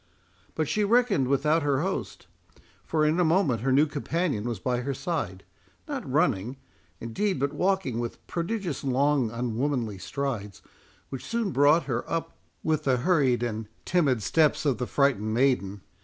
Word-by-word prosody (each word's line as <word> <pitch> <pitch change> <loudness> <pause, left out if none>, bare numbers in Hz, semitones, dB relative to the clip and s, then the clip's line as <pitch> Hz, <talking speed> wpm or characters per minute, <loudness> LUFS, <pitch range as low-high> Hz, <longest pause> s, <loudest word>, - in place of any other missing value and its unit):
But 155 -2 0
she 210 - +1
reckoned 210 - +3
without 150 +4 +2
her 140 -2 +1
host; 145 - -4 0.6
for 155 -1 +1
in 155 +3 +2
a - - +4
moment 160 - +2
her 135 +2 +1
new 140 +4 +5
companion 145 - -2
was 120 -2 -2
by 125 +7 -1
her 135 +2 -3
side, 100 - -3 0.4
not - - -5
running, 115 +8 +1 0.4
indeed, 140 - -1
but 140 +1 0
walking 185 -11 0
with 120 -1 -5
prodigious 175 - -3
long 135 -1 +2
unwomanly 120 -2 -2
strides, 115 -3 -4 0.5
which 135 - -6
soon 230 -4 -1
brought 145 +4 +4
her 120 -3 -2
up 165 0 -3 0.3
with 155 -2 0
the 130 -2 +3
hurried 130 -4 +2
and 110 -2 -3 0.2
timid 140 - +2
steps 155 +3 +2
of 135 -4 +1
the 125 - -2
frightened 110 -7 +1
maiden. 115 -7 +1
140 Hz, 155 wpm, -27 LUFS, 120-165 Hz, 0.6 s, new